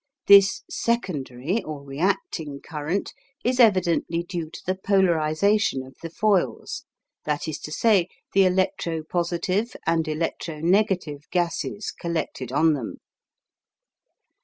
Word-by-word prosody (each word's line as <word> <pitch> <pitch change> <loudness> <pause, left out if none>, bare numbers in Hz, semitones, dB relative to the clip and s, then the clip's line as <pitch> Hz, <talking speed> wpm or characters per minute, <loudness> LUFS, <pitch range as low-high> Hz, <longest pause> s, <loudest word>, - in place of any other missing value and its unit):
This 195 -1 +7
"secondary" 180 - -1
or 150 -2 -7
reacting 155 - -2
current 160 +5 -3 0.3
is 250 +1 0
evidently 175 -6 +3
due 170 -3 -5
to - - -10
the 185 - +1
polarisation 190 -3 +2
of 130 0 -14
the 165 - -5
foils 200 +1 0 0.4
that 150 +1 -1
is 155 - -4
to 150 - -8
say, 195 -1 +3 0.3
the 195 0 +5
electro 185 -3 0
positive 180 +7 -1
and 165 0 +1
electro 155 0 -3
negative 175 -4 +1
gases 180 +4 -1
collected 160 -7 -4
on 160 +4 +4
them. 130 -6 -5
170 Hz, 115 wpm, -24 LUFS, 155-195 Hz, 0.4 s, This